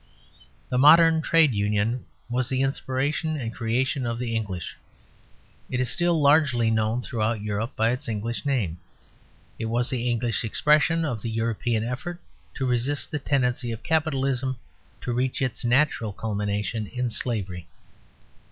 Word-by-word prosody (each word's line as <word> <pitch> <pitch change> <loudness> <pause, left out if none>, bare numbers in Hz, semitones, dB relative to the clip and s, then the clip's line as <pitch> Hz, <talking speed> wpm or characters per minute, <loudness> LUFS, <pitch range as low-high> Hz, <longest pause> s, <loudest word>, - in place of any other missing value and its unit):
The 125 - +1
modern 160 +3 +7
Trade 160 -5 +4
Union 105 +4 0 0.2
was 125 +1 -1
the 130 0 +1
inspiration 140 +4 -1
and 115 -4 -4
creation 130 +4 0
of 115 -1 -2
the 120 -1 -2
English; 95 -6 -4 0.9
it 125 - -1
is 130 - 0
still 175 -2 +2
largely 140 -6 +4
known 110 +2 0
throughout 110 -3 -1
Europe 105 +3 -3
by 110 +1 +2
its 125 - -4
English 115 +1 -3
name. 110 - -1 0.8
It 110 - -2
was 120 +2 0
the 125 -1 -1
English 120 -2 0
expression 150 +7 +3
of 120 -8 -3
the 115 - -3
European 115 0 -1
effort 130 +9 -4 0.4
to 135 - -2
resist 125 +3 -1
the 150 - -1
tendency 125 -3 0
of 115 +1 -6
Capitalism 135 -5 0 0.4
to 120 - -2
reach 125 +1 -1
its 130 -4 -2
natural 120 -4 +2
culmination 105 +1 -2
in 125 +3 -2
slavery. 95 -9 -3
120 Hz, 145 wpm, -25 LUFS, 110-135 Hz, 0.9 s, modern